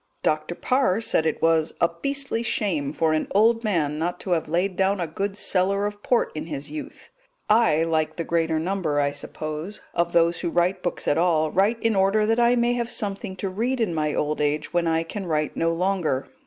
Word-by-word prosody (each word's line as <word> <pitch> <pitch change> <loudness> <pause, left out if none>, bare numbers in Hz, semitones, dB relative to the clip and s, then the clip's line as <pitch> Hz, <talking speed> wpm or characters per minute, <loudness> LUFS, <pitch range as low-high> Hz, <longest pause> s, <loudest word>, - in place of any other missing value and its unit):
Dr. 155 +2 0
Parr 255 -5 +1
said 225 -8 +1
it 160 - -2
was 165 -1 +2
"a 170 - +4
beastly 270 +8 -2
shame 175 -11 -1
for 160 +1 +1
an 155 - 0
old 225 +3 +4
man 155 -8 0
not 175 +2 -2
to 190 - -5
have 165 -3 0
laid 180 +3 0
down 195 +1 +1
a 175 - 0
good 195 +5 -4
cellar 200 +1 +1
of 205 0 -5
port 245 +2 +1
in 155 +1 -5
his 145 -2 -6
youth"; 155 - -8 0.4
I, 215 -8 +4
like 160 -1 0
the 170 - -3
greater 165 -1 0
number, 165 -3 -1
I 140 0 +1
suppose, 155 +6 -6
of 170 0 0
those 170 0 +3
who - - -2
write 175 +2 +1
books 175 - -3
at 145 - +2
all, 160 -3 +2
write 205 +5 +2
in 225 -2 +2
order 195 +2 +3
that 225 +2 +1
I 240 +1 +4
may 240 0 +2
have 235 -1 -2
something 200 -4 -4
to 195 +1 -3
read 240 +7 -1
in 215 -7 0
my 150 -2 -1
old 150 0 -1
age 150 +2 -1
when 175 -1 +1
I 165 0 +1
can 190 +3 -6
write 155 -2 -1
no 165 0 +1
longer. 170 -6 0
175 Hz, 215 wpm, -24 LUFS, 155-205 Hz, 0.4 s, a